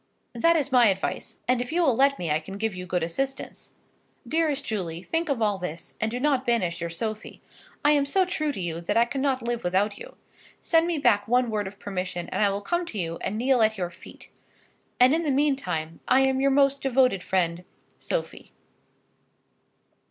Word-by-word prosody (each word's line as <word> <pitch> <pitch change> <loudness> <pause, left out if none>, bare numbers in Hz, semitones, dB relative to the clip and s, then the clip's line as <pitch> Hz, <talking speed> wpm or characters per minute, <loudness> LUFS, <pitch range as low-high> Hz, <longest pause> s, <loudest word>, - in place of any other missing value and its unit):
That 335 +8 +3
is 290 -3 0
my 245 -3 +6
advice, 195 -1 -2
and 250 0 +2
if 245 - -5
you 345 +2 +2
will 270 -7 +3
let 275 +2 +3
me 170 -3 -3
I 150 - +2
can 195 +5 -9
give 220 0 -1
you 180 0 -7
good 180 -1 -1
assistance. 270 +11 -4 0.5
Dearest 315 -3 0
Julie, 175 -5 -4
think 325 - -1
of 250 -5 0
all 205 -2 +1
this, 170 -2 -7
and 220 - +1
do 245 +2 -4
not 275 -2 +1
banish 195 -9 0
your 170 - -2
Sophie. 215 +6 -5 0.5
I 295 - +6
am 285 -2 +2
so 375 +6 +3
true 320 -5 -1
to 245 - -7
you, 170 -2 -3
that 170 - -1
I 230 - +6
cannot 265 -1 -1
live 240 0 -2
without 200 +3 0
you. - - -11 0.4
Send 330 0 +2
me 345 -2 -1
back 240 -8 +2
one 245 0 +2
word 210 -2 -1
of 200 +1 -10
permission, 185 -3 -4
and - - 0
I 205 - +4
will 200 +1 -3
come 345 +10 -1
to 220 - -6
you, 165 -3 -2
and 210 - -3
kneel 250 +1 +2
at 220 0 +3
your 175 -2 -3
feet. 170 - -14 0.7
And 250 +3 +6
in 325 - +2
the 315 - -1
meantime, 270 - -1
I 255 +1 +5
am 265 0 +2
Your 275 - +4
most 275 0 +3
devoted 255 -7 +2
friend, 175 -2 -1 0.4
SOPHIE. - - -4
235 Hz, 205 wpm, -26 LUFS, 190-275 Hz, 0.7 s, my